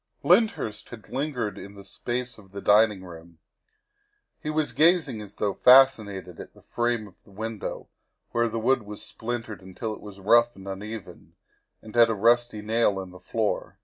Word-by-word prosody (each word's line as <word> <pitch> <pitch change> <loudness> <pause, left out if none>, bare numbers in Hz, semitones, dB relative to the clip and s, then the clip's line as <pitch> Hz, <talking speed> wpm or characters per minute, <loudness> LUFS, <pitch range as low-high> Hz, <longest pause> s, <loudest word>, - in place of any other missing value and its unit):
' - - -55
' - - -40
Lyndhurst 180 - +2
had 115 -3 -12
lingered 130 -5 -3
in 100 +1 -10
the 100 -1 -12
space 120 +3 -4
off 95 -3 -18
the 100 - -5
dining 105 -1 +4
room. 85 -2 -12 1.0
He 150 - -4
was 155 -1 0
gazing 155 -8 +3
as 105 -1 -11
though 100 -2 -1
fascinated 110 -8 +4
at - - -10
the - - -19
frame 120 -2 -1
of 95 - -21
the - - -22
window 110 +1 -6 0.4
where 120 0 +1
the 115 - -4
wood 120 +3 +2
was 105 -1 -8
splintered 115 -3 -5
until 95 +4 -6
it - - -11
was 100 -1 -11
rough 120 +4 +4
and 95 0 -12
uneven, 105 +2 -8 0.5
and 110 0 -12
at 115 -1 +6
a 115 - 0
rusty 115 0 +2
nail 110 -2 +1
in 95 -1 -7
the 90 - -13
floor. 110 +1 -2
110 Hz, 185 wpm, -26 LUFS, 100-120 Hz, 1.0 s, at